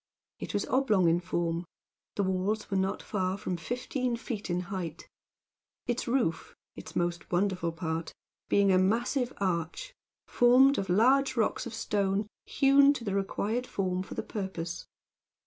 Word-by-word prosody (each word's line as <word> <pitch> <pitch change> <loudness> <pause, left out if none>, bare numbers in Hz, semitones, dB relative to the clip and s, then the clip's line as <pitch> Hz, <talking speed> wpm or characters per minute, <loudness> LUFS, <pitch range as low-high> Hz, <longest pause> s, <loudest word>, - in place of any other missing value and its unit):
It - - -5
was - - 0
oblong 215 -9 +2
in 165 +1 +3
form: 170 -1 -2 0.5
the 200 - +1
walls 190 +3 -1
were - - 0
not 190 0 -1
far 190 -2 -1
from 190 -3 -3
fifteen 250 - -2
feet 220 -4 -5
in 175 +1 0
height: 170 -4 -5 0.8
its 240 0 -2
roof 235 -10 -1 0.2
its - - -10
most 175 0 -2
wonderful 180 -2 0
part 165 -1 -4 0.4
being 200 -1 +4
a 185 - +5
massive 240 +6 +1
arch, 185 - -2 0.3
formed 260 +3 +5
of 195 - -3
large 260 +7 +4
blocks 230 0 0
of 230 - -7
stone 205 -2 0 0.2
hewn 275 +1 +5
to 260 - -6
the 200 -4 -2
required 210 +5 -1
form 185 -2 -1
for 190 - -8
the - - -3
purpose. 185 -5 -5
195 Hz, 150 wpm, -29 LUFS, 180-240 Hz, 0.8 s, a